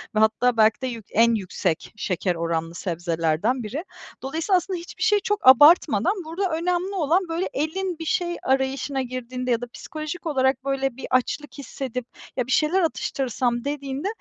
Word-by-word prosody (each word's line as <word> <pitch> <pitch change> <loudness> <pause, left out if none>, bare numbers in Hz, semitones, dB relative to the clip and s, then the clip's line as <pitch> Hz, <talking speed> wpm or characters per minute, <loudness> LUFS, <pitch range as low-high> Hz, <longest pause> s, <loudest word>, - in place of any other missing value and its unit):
ve - - +3
hatta 230 +3 +3
belki 220 +3 +4
de 260 - -1
yük 230 -4 -6
en 230 +2 +4
yüksek 185 -4 -2
şeker 180 -3 -1
oranlı 165 0 -2
sebzelerden 170 +7 -1
biri. 265 +10 -4 0.4
Dolayısıyla 320 +8 +1
aslında 360 0 -3
hiçbir 340 - -7
şey 420 -1 +4
çok 415 -5 -1
abartmadan, 290 - +7
burada 350 +4 -2
önemli 360 +3 -1
olan 350 +2 +2
böyle 335 +3 -1
elin 335 +4 -2
bir 325 - -5
şey 345 +1 0
arayışına 265 +1 0
girdiğinde 255 0 -4
ya 235 0 +1
da 245 - -5
psikolojik 310 +3 -7
olarak 265 -3 +1
böyle 270 -2 -1
bir - - -6
açlık 255 +4 0
hissedip 260 -3 -5 0.3
“Ya, 250 - 0
bir - - -4
şeyler 325 +7 +3
atıştırsam.” 250 -6 -1
dediğinde, 285 +2 -3
265 Hz, 165 wpm, -24 LUFS, 235-325 Hz, 0.4 s, abartmadan